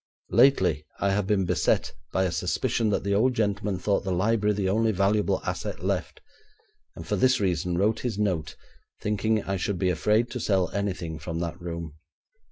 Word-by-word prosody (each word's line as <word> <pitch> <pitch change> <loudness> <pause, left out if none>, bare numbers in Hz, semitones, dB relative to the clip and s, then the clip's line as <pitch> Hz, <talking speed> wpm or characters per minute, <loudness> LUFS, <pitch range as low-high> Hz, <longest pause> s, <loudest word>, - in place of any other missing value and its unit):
Lately, 95 - +4 0.2
I 100 - +1
have 100 -1 0
been 95 -2 +2
beset 90 -2 +1 0.2
by 95 - +1
a 90 - 0
suspicion 110 +5 0
that 100 - 0
the 100 0 0
old 125 +5 +3
gentleman 105 -2 0
thought 100 +2 0
the 95 - -2
library 105 +3 +1
the 100 -2 -1
only 110 +3 +2
valuable 100 +1 +1
asset - - -4
left, - - -2 0.7
and 80 - -8
for 105 - 0
this 130 +5 +3
reason 90 -2 0
wrote 105 +4 +2
his 120 -5 -3
note, 95 -7 -1 0.4
thinking 105 +1 0
I 95 -1 -2
would 100 - -1
be 90 0 +1
afraid 105 +8 +1
to 125 - -4
sell 95 -5 +1
anything 90 -6 -3
from 80 +2 -5
that 85 +1 -4
room. 85 -3 -6
100 Hz, 180 wpm, -26 LUFS, 90-105 Hz, 0.7 s, Lately